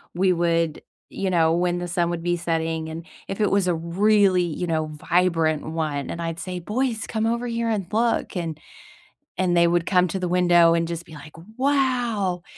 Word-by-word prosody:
we 185 Hz, +1 st, +3 dB
would, 165 Hz, -2 st, 0 dB, 0.3 s
you 195 Hz, -, -3 dB
know, 165 Hz, -3 st, +3 dB
when 175 Hz, +1 st, +1 dB
the 175 Hz, 0 st, -4 dB
sun 170 Hz, -1 st, 0 dB
would 170 Hz, -1 st, -4 dB
be 175 Hz, 0 st, 0 dB
setting 165 Hz, -1 st, -2 dB
and 160 Hz, +1 st, -7 dB, 0.2 s
if 195 Hz, +2 st, -4 dB
it 210 Hz, -, +2 dB
was 195 Hz, -2 st, +2 dB
a 175 Hz, -, +2 dB
really, 185 Hz, +2 st, +3 dB
you 170 Hz, +1 st, -3 dB
know, 160 Hz, -2 st, 0 dB, 0.3 s
vibrant 165 Hz, -4 st, +2 dB
one 155 Hz, -3 st, -3 dB
and 170 Hz, -, -5 dB
I'd 165 Hz, 0 st, -4 dB
say, 180 Hz, 0 st, -5 dB
"Boys, 225 Hz, +5 st, -2 dB
come 220 Hz, -1 st, -1 dB
over 235 Hz, +2 st, -1 dB
here 230 Hz, -1 st, -1 dB
and 210 Hz, -4 st, -1 dB
look," 230 Hz, 0 st, 0 dB
and 165 Hz, -4 st, -3 dB, 0.8 s
and 180 Hz, -2 st, +1 dB
they 170 Hz, 0 st, +5 dB
would 170 Hz, 0 st, +1 dB
come 180 Hz, -1 st, +3 dB
to 190 Hz, -, -3 dB
the 180 Hz, -, -2 dB
window 175 Hz, -1 st, +4 dB
and 165 Hz, 0 st, 0 dB
just 170 Hz, 0 st, -5 dB
be 165 Hz, -, -14 dB
like, 150 Hz, +1 st, -12 dB, 0.2 s
"Wow!" 245 Hz, -10 st, 0 dB
175 Hz, 200 wpm, -23 LUFS, 165-200 Hz, 0.8 s, they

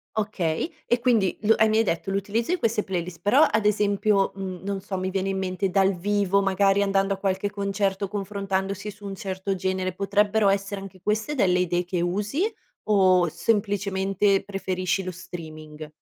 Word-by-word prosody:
Okay, 205 Hz, -, -1 dB, 0.2 s
e 240 Hz, -, +2 dB
quindi 230 Hz, -6 st, +2 dB
l 220 Hz, +2 st, +5 dB
e 220 Hz, -, +4 dB
mi 215 Hz, -, +2 dB
hai 225 Hz, -, +4 dB
detto 195 Hz, 0 st, -2 dB
l'utilizzo 205 Hz, -, -1 dB
di 365 Hz, -, +2 dB
queste 225 Hz, -2 st, +1 dB
playlist, 180 Hz, -2 st, -4 dB
però 275 Hz, +10 st, +5 dB
ad 215 Hz, 0 st, 0 dB
esempio, 205 Hz, -1 st, +2 dB
mhmm, 190 Hz, -2 st, -5 dB
non 195 Hz, -1 st, -3 dB
so, 195 Hz, -1 st, -4 dB
mi 185 Hz, 0 st, -2 dB
viene 195 Hz, 0 st, -1 dB
in 195 Hz, -, -1 dB
mente 190 Hz, 0 st, -1 dB
dal 195 Hz, +1 st, +3 dB
vivo, 200 Hz, +1 st, +1 dB
magari 195 Hz, +1 st, +2 dB
andando 195 Hz, 0 st, +1 dB
a 195 Hz, -, -5 dB
qualche 195 Hz, +1 st, -1 dB
concerto, 200 Hz, -1 st, -1 dB
confrontandosi 200 Hz, 0 st, -3 dB
su 205 Hz, 0 st, -14 dB
un 195 Hz, -1 st, -5 dB
certo 190 Hz, 0 st, -3 dB
genere, 185 Hz, 0 st, -2 dB
potrebbero 205 Hz, +1 st, +2 dB
essere 195 Hz, 0 st, -1 dB
anche 190 Hz, -1 st, -11 dB
queste 215 Hz, +7 st, -1 dB
delle 180 Hz, -9 st, +2 dB
idee 180 Hz, 0 st, 0 dB
che 175 Hz, -1 st, -2 dB
usi? 210 Hz, -, -1 dB, 0.4 s
O 185 Hz, -4 st, +4 dB
semplicemente 195 Hz, +1 st, +1 dB
preferisci 190 Hz, -1 st, -2 dB
lo 185 Hz, -, -4 dB
streaming? 155 Hz, -4 st, -9 dB
195 Hz, 175 wpm, -25 LUFS, 185-205 Hz, 0.4 s, l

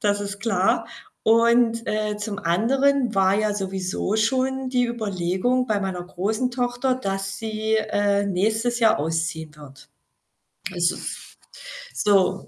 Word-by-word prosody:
Das 205 Hz, -2 st, +1 dB
ist 200 Hz, 0 st, -5 dB
klar 205 Hz, +1 st, +1 dB, 0.4 s
und, 230 Hz, 0 st, +3 dB
äh, 210 Hz, 0 st, -1 dB
zum 210 Hz, -1 st, -4 dB
anderen 245 Hz, +8 st, +2 dB
war 190 Hz, 0 st, +3 dB
ja 210 Hz, 0 st, +1 dB
sowieso 190 Hz, +1 st, -2 dB
schon 260 Hz, +4 st, 0 dB
die 250 Hz, -1 st, +2 dB
Überlegung 215 Hz, +2 st, -1 dB
bei 215 Hz, -3 st, 0 dB
meiner 190 Hz, -2 st, -3 dB
großen 215 Hz, +8 st, -2 dB
Tochter, 245 Hz, +1 st, 0 dB
dass 195 Hz, -5 st, -3 dB
sie, 220 Hz, 0 st, -2 dB
äh, 205 Hz, -2 st, +1 dB
nächstes 220 Hz, +5 st, 0 dB
Jahr 225 Hz, -2 st, +4 dB
ausziehen 160 Hz, 0 st, -2 dB
wird. 140 Hz, -2 st, -14 dB, 0.9 s
Es 175 Hz, -1 st, +2 dB
ist, -, -, -7 dB, 0.6 s
so, 195 Hz, -3 st, +2 dB
210 Hz, 130 wpm, -23 LUFS, 190-235 Hz, 0.9 s, Jahr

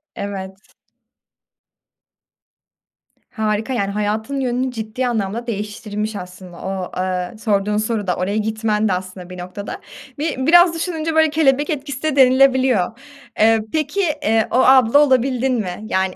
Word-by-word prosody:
Evet. 195 Hz, 0 st, -7 dB, 2.6 s
Harika, 220 Hz, +2 st, -1 dB
yani, 200 Hz, -4 st, -1 dB
hayatın 215 Hz, +6 st, -2 dB
yönünü 255 Hz, 0 st, -1 dB
ciddi 225 Hz, +2 st, -3 dB
anlamda 225 Hz, +1 st, -2 dB
değiştirmiş 210 Hz, 0 st, -4 dB
aslında. 180 Hz, -2 st, -9 dB
O, 190 Hz, -1 st, -4 dB
eee, 185 Hz, +2 st, -2 dB
sorduğun 210 Hz, -1 st, 0 dB
soru 215 Hz, -2 st, -2 dB
da 180 Hz, -, +1 dB
oraya 200 Hz, +4 st, -2 dB
gitmen 220 Hz, 0 st, 0 dB
de 190 Hz, -, +1 dB
aslında 185 Hz, 0 st, -6 dB
bir 180 Hz, -, -9 dB
noktada. 185 Hz, +3 st, -7 dB, 0.4 s
Bi 310 Hz, 0 st, -1 dB
biraz 340 Hz, +5 st, +6 dB
düşününce, 325 Hz, -1 st, -3 dB
böyle, 315 Hz, -1 st, +4 dB
kelebek 290 Hz, -2 st, +2 dB
etkisi 285 Hz, -2 st, -4 dB
de 310 Hz, -3 st, 0 dB
denilebiliyor. 260 Hz, -5 st, +3 dB, 0.4 s
Eee, 225 Hz, +1 st, +5 dB
peki, 315 Hz, +5 st, 0 dB, 0.2 s
eee, 220 Hz, 0 st, +2 dB
o -, -, -1 dB
abla 260 Hz, 0 st, +6 dB
olabildin 260 Hz, -2 st, +2 dB
mi? 195 Hz, -7 st, -3 dB
Yani, 190 Hz, -3 st, -1 dB
220 Hz, 135 wpm, -19 LUFS, 200-265 Hz, 2.6 s, biraz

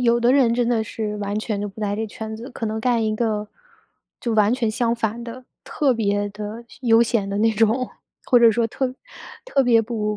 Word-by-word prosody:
有 235 Hz, -1 st, +3 dB
的 240 Hz, +2 st, +3 dB
人 255 Hz, -4 st, +4 dB
真 240 Hz, 0 st, +1 dB
的 230 Hz, -2 st, +1 dB
是 215 Hz, -1 st, -4 dB
完 205 Hz, 0 st, -2 dB
全 215 Hz, -2 st, -3 dB
就 205 Hz, -, -3 dB
不 195 Hz, +2 st, -15 dB
在 205 Hz, -1 st, -1 dB
这 220 Hz, +2 st, -2 dB
圈 220 Hz, +1 st, -7 dB
子， 235 Hz, +5 st, -8 dB
可 230 Hz, -, -5 dB
能 220 Hz, 0 st, -2 dB
干 235 Hz, -1 st, +1 dB
一 215 Hz, 0 st, 0 dB
个， 215 Hz, -2 st, -1 dB, 0.7 s
就 235 Hz, -, -2 dB
完 215 Hz, 0 st, +3 dB
全 245 Hz, -3 st, 0 dB
相 235 Hz, +1 st, 0 dB
反 230 Hz, 0 st, -2 dB
的， 245 Hz, +2 st, -9 dB, 0.2 s
特 285 Hz, -4 st, +1 dB
别 205 Hz, -3 st, 0 dB
的 210 Hz, +3 st, -7 dB
闲 245 Hz, 0 st, -8 dB
悠 225 Hz, +1 st, +6 dB
闲 220 Hz, -4 st, 0 dB
的 200 Hz, -, -3 dB
那 225 Hz, +1 st, +3 dB
种， 225 Hz, +4 st, +1 dB, 0.3 s
或 245 Hz, -, +5 dB
者 230 Hz, -1 st, +7 dB
说 225 Hz, +1 st, +1 dB
特 255 Hz, +2 st, -3 dB, 0.5 s
特 280 Hz, -, +2 dB
别 235 Hz, -3 st, +4 dB
不， 210 Hz, -2 st, -2 dB
225 Hz, 240 characters per minute, -22 LUFS, 210-240 Hz, 0.7 s, 者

